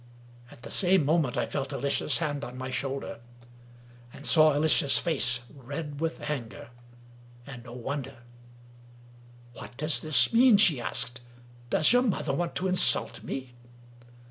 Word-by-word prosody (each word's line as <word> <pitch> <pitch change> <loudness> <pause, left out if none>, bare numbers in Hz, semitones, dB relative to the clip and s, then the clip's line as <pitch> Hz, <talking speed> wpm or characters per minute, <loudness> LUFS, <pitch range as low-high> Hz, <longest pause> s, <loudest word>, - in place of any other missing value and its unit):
At 120 - -17
the - - -9
same 185 -4 +3
moment 150 -4 0
I - - 0
felt 135 0 -5
Alicia's 140 0 -1
hand 145 -4 -3
on 125 -1 -8
my 130 0 -6
shoulder, 135 0 -4 0.9
and 140 - -12
saw 155 -3 +5
Alicia's 150 -1 +3
face 130 -7 0
red 145 +2 -8
with 165 0 -3
anger 145 -1 -6 0.4
— 120 0 -24
and 125 -4 -10
no 120 - -11
wonder! 130 0 -7 1.3
"What 120 - -12
does 155 +1 +1
this 155 +7 +3
mean?" 240 -2 +6
she 160 - +4
asked. 120 +1 -2 0.5
"Does 155 - +4
your 245 - +4
mother 200 - -2
want 170 +3 -3
to 185 - -1
insult 185 0 +2
me? 130 -2 -7
140 Hz, 145 wpm, -27 LUFS, 125-160 Hz, 1.3 s, mean